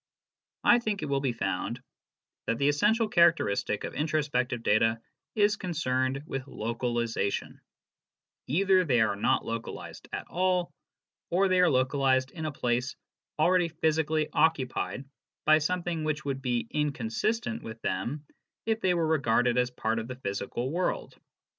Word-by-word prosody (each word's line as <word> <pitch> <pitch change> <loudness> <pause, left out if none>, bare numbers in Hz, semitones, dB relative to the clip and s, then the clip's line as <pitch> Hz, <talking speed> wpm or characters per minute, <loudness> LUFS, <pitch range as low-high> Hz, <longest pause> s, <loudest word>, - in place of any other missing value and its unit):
I 240 - +6
think 215 -4 -2
it 150 - -3
will 140 -1 +1
be 135 -3 +1
found 115 +2 -2 0.7
that 115 - +1
the 140 +2 +3
essential 215 +10 +2
characteristic 170 - +2
of - - -5
introspective 145 -6 -1
data 115 +1 +3 0.4
is 205 -1 +3
concerned 135 -7 -1
with 135 -2 -5
localization: 115 -3 -2 0.9
either 185 +6 +3
they 125 -8 +2
are 110 -2 +2
not 100 - +1
localized 115 0 -6
at - - -4
all, 180 0 0 0.6
or 190 +3 +3
they 185 0 +3
are 180 - +5
localized 130 -1 +2
in 160 -2 -6
a - - -2
place 125 -1 -1 0.4
already 175 +2 +3
physically 160 -1 0
occupied 140 -3 0 0.4
by 155 0 +6
something 170 0 -1
which 150 -1 -2
would 135 -1 -2
be 120 -3 -1
inconsistent 150 - -1
with 110 0 -8
them 120 +11 -2 0.4
if 225 0 0
they 180 -2 +2
were 170 -1 +1
regarded 125 -5 +2
as 125 0 +1
part 115 -2 -1
of 115 - -5
the 130 - -6
physical 120 +3 -3
world. 185 - -2
145 Hz, 145 wpm, -28 LUFS, 120-170 Hz, 0.9 s, I